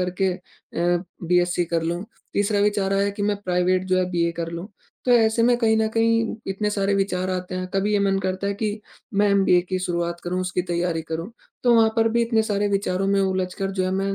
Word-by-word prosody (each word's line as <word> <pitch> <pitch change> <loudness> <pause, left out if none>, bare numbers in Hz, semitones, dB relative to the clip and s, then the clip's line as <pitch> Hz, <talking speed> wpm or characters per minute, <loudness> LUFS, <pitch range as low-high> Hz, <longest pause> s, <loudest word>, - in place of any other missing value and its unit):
करके 180 +1 0
अ, 175 0 -3 0.2
B 180 +1 +3
SC 175 0 0
कर 165 -1 -1
लूँ। 170 +3 -2 0.3
तीसरा 205 0 +1
विचार 205 -1 +1
आया 200 +1 +2
कि 200 0 -5
मैं 205 0 +1
प्राइवेट 180 0 +1
जो 185 0 +2
है 185 - +2
बीए 170 -1 0
कर 165 0 -4
लूँ। 170 +3 -5 0.4
तो 250 - +1
ऐसे 225 -1 +4
में 240 +1 +4
कहीं 220 -2 +3
न 220 0 +2
कहीं 225 0 +1
इतने 210 +2 -1
सारे 200 -1 0
विचार 185 -1 0
आते 185 0 -3
हैं। 185 0 -3
कभी 200 +2 +1
ये 205 - +3
मन 195 -1 +2
करता 190 +1 -2
है 200 - -1
कि 210 +1 -3 0.3
मैं 205 +1 +3
एमबीए 195 -3 +4
की 185 -1 -1
शुरुआत 170 -1 -2
करूँ, 180 +1 -1
उसकी 180 0 -1
तैयारी 170 -2 -1
करूँ। 165 +5 -5 0.3
तो 240 -1 +5
वहाँ 225 -1 +5
पर 225 0 +4
भी 235 +1 +1
इतने 230 -1 +2
सारे 205 -1 0
विचारों 195 -1 0
में 200 0 +2
उलझकर 190 +1 -1
जो 190 -1 -1
है 185 - -1
मैं 195 +1 -1
195 Hz, 230 wpm, -23 LUFS, 180-205 Hz, 0.4 s, तो